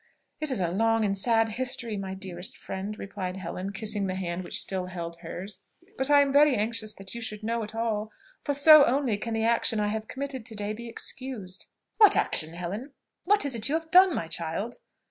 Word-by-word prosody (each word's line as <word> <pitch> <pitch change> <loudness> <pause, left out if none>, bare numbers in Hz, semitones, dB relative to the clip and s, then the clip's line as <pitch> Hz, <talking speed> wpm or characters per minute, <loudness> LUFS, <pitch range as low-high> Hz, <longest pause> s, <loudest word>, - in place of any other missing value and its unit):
"It 310 -1 -1
is 260 - 0
a 175 -2 0
long 225 +3 +2
and 200 -1 0
sad 225 +2 +3
history, 235 -1 -2
my 190 -1 -5
dearest 190 -1 -5
friend," 200 +3 -6
replied 190 -2 -5
Helen, 185 +1 -5
kissing 205 -1 -1
the 185 - -3
hand 180 -1 -3
which - - 0
still 185 -2 -2
held 170 -2 -6
hers, 180 +4 -7 0.3
"but 265 -5 -1
I 290 -1 +7
am 280 -1 +1
very 290 -1 +6
anxious 220 0 0
that 195 -1 -6
you 235 - -6
should 215 -1 -5
know 230 +1 -1
it 215 0 -7
all; 220 -2 -2 0.3
for 285 - -1
so 305 +1 +9
only 255 -3 +1
can 230 +1 -3
the 225 0 0
action 230 -1 +2
I 210 0 +1
have 215 0 -4
committed 270 -2 -5
to 220 - -6
day 205 0 -3
be 235 +2 -8
excused." 230 -6 -3 0.3
"What 425 -3 +7
action, 160 +1 +2
Helen? 200 +11 -6 0.3
what 410 -2 +3
is 280 - 0
it 230 +2 0
you 305 - +1
have 320 0 -4
done, 365 -1 +7
my - - -2
child?" 170 +8 -4
220 Hz, 215 wpm, -27 LUFS, 190-255 Hz, 0.3 s, so